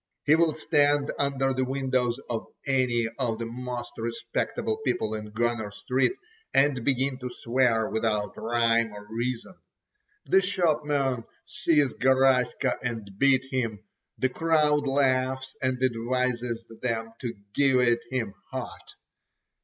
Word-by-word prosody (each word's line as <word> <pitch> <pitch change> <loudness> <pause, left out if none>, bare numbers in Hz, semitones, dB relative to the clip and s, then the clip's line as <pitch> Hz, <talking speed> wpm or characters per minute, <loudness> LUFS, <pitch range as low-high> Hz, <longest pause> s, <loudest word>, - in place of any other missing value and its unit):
He 150 - +5
will 160 -1 +3
stand 145 -2 +2
under 135 -1 +1
the 130 0 0
windows 130 -2 0
of 115 -2 -3 0.2
any 125 -4 +2
of 115 -4 0
the 115 - -4
most 125 +1 -5
respectable 115 - -2
people 110 - 0
in 105 -1 -5
Gunner 115 -1 -1
Street, 125 - 0 0.4
and 135 -3 +3
begin 135 0 +1
to 125 -1 -4
swear 120 -2 +1
without 105 -2 -1
rhyme 115 -1 +2
or 105 0 -9
reason. 120 +8 -3 0.7
The 190 - +4
shopmen 150 - +1 0.2
seize 145 -5 +2
Garaska 130 0 +2
and 115 -5 -4
beat 135 -1 +4
him—the 115 0 -3
crowd 150 -1 +2
laughs 130 -1 +1
and 130 -1 0
advises 120 -1 0 0.2
them 115 -2 -2
to 120 -3 -4 0.2
give 135 -1 +4
it 120 -1 +3
him 115 -6 -2 0.2
hot. - - -7
125 Hz, 125 wpm, -27 LUFS, 115-135 Hz, 0.7 s, He